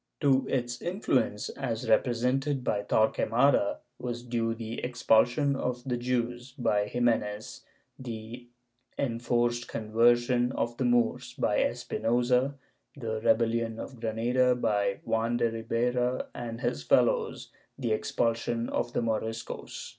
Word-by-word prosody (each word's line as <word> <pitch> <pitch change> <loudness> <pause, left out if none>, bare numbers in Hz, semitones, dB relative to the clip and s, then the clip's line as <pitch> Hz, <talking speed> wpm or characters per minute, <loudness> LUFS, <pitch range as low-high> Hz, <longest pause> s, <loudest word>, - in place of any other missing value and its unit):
^ - - -55
To 135 -3 +3
its 120 -2 -2
influence, 135 - 0
as 125 -2 -4
represented 130 +4 +1
by 105 -4 0
Torqucmada, 110 +3 +2 0.2
was 120 -1 -4
due 115 -2 -1
the 115 0 -5
expul 125 -2 +4
sion 140 +2 0
of 125 -2 -3
the 125 -2 -1
Jews; 120 +1 -2
by 105 -6 +1
Ximenes, 110 -3 -1 0.4
the 120 0 -7 0.5
enforced 120 -1 0
conversion 120 +3 +2
of 120 0 -2
the 130 - 0
Moors; 120 -1 +1
by - - +1
Espinosa, 125 +4 +1 0.4
the 110 -5 -4
rebellion 115 0 +2
of 130 -4 -8
Granada; 120 +3 +2
by 105 -4 0
Juan 115 +1 +1
de 115 -1 +1
Ribera 125 +2 -1
and 115 -1 -6
his 70 - -1
fellows, 70 - +1 0.3
the 120 -4 -2
expulsion 115 +1 0
of 120 0 -2
the - - +1
Moriscos. 115 0 -4
120 Hz, 125 wpm, -29 LUFS, 115-125 Hz, 0.5 s, expul